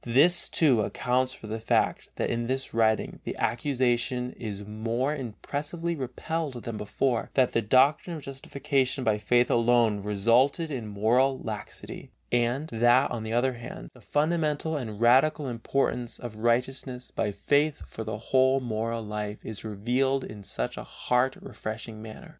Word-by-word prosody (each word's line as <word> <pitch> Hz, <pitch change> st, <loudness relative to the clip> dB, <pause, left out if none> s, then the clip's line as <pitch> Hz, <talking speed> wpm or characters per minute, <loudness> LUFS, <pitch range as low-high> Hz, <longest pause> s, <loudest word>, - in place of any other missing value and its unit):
This, 155 Hz, +9 st, +5 dB
too, 135 Hz, -9 st, +4 dB
accounts 125 Hz, +4 st, 0 dB
for -, -, -12 dB
the 110 Hz, +1 st, -4 dB
fact 110 Hz, -, +1 dB
that -, -, -1 dB
in 120 Hz, 0 st, -1 dB
this 130 Hz, +1 st, -2 dB
writing 110 Hz, -1 st, +1 dB
the -, -, -5 dB
accusation 125 Hz, 0 st, 0 dB
is 105 Hz, -3 st, -6 dB
more 115 Hz, +7 st, -1 dB
impressively 145 Hz, +7 st, -4 dB
repelled 140 Hz, -1 st, -4 dB
than 115 Hz, -, -4 dB
before, 115 Hz, +3 st, -1 dB
that 130 Hz, -2 st, +4 dB
the 115 Hz, -, +1 dB
doctrine 135 Hz, -, +3 dB
of 155 Hz, -, -8 dB
justification 135 Hz, 0 st, -1 dB
by 110 Hz, -3 st, +2 dB
faith 120 Hz, +3 st, +3 dB
alone 115 Hz, -3 st, +3 dB
resulted 115 Hz, -, +2 dB
in 120 Hz, -6 st, -4 dB
moral 120 Hz, +6 st, +2 dB
laxity, 110 Hz, -2 st, -7 dB, 0.2 s
and 120 Hz, +5 st, +1 dB
that, 120 Hz, +4 st, +4 dB
on 115 Hz, -, -3 dB
the 110 Hz, +1 st, -4 dB
other 130 Hz, +2 st, +2 dB
hand, 120 Hz, -1 st, -9 dB
the -, -, -17 dB
fundamental 155 Hz, 0 st, 0 dB
and 110 Hz, -7 st, -4 dB
radical 135 Hz, +5 st, +4 dB
importance 120 Hz, 0 st, -1 dB
of 120 Hz, -3 st, -8 dB
righteousness 125 Hz, +2 st, -1 dB
by 105 Hz, -, -1 dB
faith 145 Hz, +9 st, +1 dB
for 110 Hz, -, -7 dB
the 110 Hz, -1 st, -4 dB
whole 130 Hz, +4 st, +3 dB
moral 115 Hz, -1 st, -2 dB
life 105 Hz, 0 st, -4 dB
is 110 Hz, -2 st, -6 dB
revealed 125 Hz, +6 st, 0 dB
in 105 Hz, -2 st, -9 dB
such -, -, -4 dB
a -, -, -5 dB
heart 125 Hz, +2 st, 0 dB
refreshing 110 Hz, 0 st, -7 dB
manner. 110 Hz, -1 st, -10 dB
120 Hz, 155 wpm, -27 LUFS, 110-135 Hz, 0.2 s, This